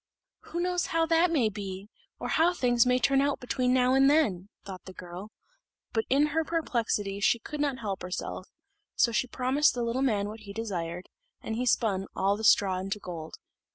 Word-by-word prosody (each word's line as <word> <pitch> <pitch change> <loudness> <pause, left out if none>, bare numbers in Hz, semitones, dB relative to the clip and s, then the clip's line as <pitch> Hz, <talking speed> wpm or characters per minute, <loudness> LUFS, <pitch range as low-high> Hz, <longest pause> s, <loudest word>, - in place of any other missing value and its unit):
"Who 340 - -5
knows 355 0 0
how 330 0 +1
that 330 +2 +3
may 285 -9 +2
be, 200 0 -6 0.3
or - - -5
how 340 +3 +3
things 245 -4 +3
may 250 0 +4
turn 270 +2 +3
out 285 0 0
between 250 0 0
now 255 0 +3
and 270 +1 +5
then?" 205 - +2 0.2
thought 190 -2 -9
the 185 - -10
girl, 180 +3 -9 0.6
but 225 -2 0
in 280 +3 +4
her 320 0 +2
perplexity 230 -11 -1
she 205 - +3
could 290 +6 -6
not 280 -3 0
help 200 -3 -3
herself: 180 +1 -5 0.5
so 240 - +3
she 240 +3 0
promised 260 +4 +2
the 240 - -1
little 235 +3 -1
man 210 -7 +1
what 215 +2 -8
he 205 -2 -10
desired, 180 -5 -4 0.4
and 220 - -3
he 250 +2 -2
spun 195 -5 +1
all 195 +1 +2
the 220 - -7
straw 195 -3 +4
into 195 +2 -3
gold. 170 -5 -8
230 Hz, 195 wpm, -28 LUFS, 195-270 Hz, 0.6 s, and